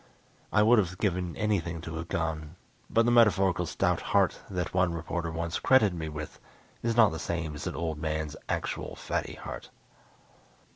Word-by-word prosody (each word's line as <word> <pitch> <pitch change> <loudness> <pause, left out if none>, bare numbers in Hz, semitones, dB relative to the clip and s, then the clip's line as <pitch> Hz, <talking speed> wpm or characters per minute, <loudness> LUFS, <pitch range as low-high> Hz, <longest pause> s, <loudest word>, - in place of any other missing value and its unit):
I 105 - +4
would 115 +1 +6
have 95 -2 -1
given 90 -4 -1
anything 90 -6 -1
to 80 -1 -6
have 85 +1 -5
gone, 80 -1 -3 0.3
but 115 0 +3
the 120 - +3
metaphorical 95 -7 +4
stout - - +1
heart - - +2
that 90 -3 -3
one 90 -2 +2
reporter 85 +1 -3
once 85 +2 -3
credited 110 -8 +4
me 80 -2 -4
with 75 0 -7 0.4
is 115 0 -1
not 110 -3 +7
the 80 - -5
same 85 -2 -3
as 75 - -5
an - - -3
old 80 -2 -3
man's 80 -1 -2
actual - - -3
fatty - - -3
heart. - - -8
85 Hz, 175 wpm, -29 LUFS, 80-100 Hz, 0.4 s, not